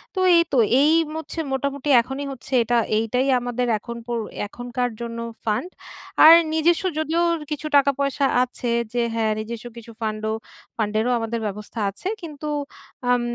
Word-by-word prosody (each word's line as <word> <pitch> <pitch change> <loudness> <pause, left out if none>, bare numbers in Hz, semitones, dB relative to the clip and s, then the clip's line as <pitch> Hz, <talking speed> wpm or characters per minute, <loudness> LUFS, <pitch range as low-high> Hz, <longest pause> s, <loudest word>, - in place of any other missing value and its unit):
তো - - -1 0.2
এই 335 - +7
তো - - +3 0.2
এই 295 +2 +5 0.2
ম - - -7
হচ্ছে 320 +1 -7
মোটামুটি 280 +1 -2
এখনই 265 +4 -5
হচ্ছে 270 +1 -9
এটা 240 +1 +1 0.2
এইটাই 250 +4 0
আমাদের 245 0 -2
এখন 235 +1 -7
পোর 240 -1 -1 0.3
এখনকার 245 +3 -3
জন্য 230 0 -5 0.3
ফান্ড। 220 +11 -1 0.6
আর 320 - +11 0.2
নিজেস্ব 330 +3 +2 0.2
যদিও 320 +2 0 0.3
কিছু 300 +1 -3
টাকা-পয়সা 280 0 +1 0.2
আছে 250 -1 -4 0.2
যে 240 - +1
হ্যাঁ 220 -1 +1
নিজেস্ব 230 +2 -6
কিছু 230 0 -10
ফান্ড 215 -1 -2
ও - - 0 0.4
ফান্ড 215 -2 -1
এরও 245 +3 +1
আমাদের 230 +1 -3
ব্যবস্থা 210 +3 -7
আছে। 200 - -7
কিন্তু 305 -3 -7 0.6
আম 245 0 +3
245 Hz, 160 wpm, -23 LUFS, 230-280 Hz, 0.6 s, আর